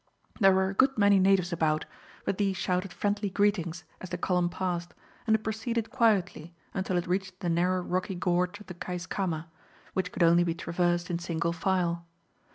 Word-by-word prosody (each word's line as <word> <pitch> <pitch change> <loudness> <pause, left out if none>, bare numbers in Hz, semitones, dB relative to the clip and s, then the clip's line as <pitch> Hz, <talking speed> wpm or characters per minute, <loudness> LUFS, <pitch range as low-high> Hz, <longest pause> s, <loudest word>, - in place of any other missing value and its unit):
There 195 -3 +7
were 190 0 +2
a - - -4
good 265 +5 +3
many 200 -1 +5
natives 190 -2 +3
about, 155 -2 +1 0.4
but 195 - -1
these 195 -2 +1
shouted 180 +1 -1
friendly 205 0 -1
greetings 180 -4 0 0.2
as 185 - -8
the 180 - -3
column 180 0 +1
passed, 175 -1 -3 0.3
and 220 - +5
it 215 - -2
proceeded 225 +1 -2
quietly 200 - +1 0.2
until 190 -1 -1
it 175 - -1
reached 190 +1 -2
the 175 - -1
narrow 180 +2 +2
rocky 185 +2 -2
gorge 180 +2 0
of 210 - -12
the 180 - -8
Keiskamma, 175 -1 -3 0.5
which 185 -1 -1
could - - 0
only 170 +1 +5
be 170 -1 -1
traversed 175 +1 0
in 170 - -1
single 170 -1 -1
file. 170 -1 0
180 Hz, 180 wpm, -29 LUFS, 175-195 Hz, 0.5 s, There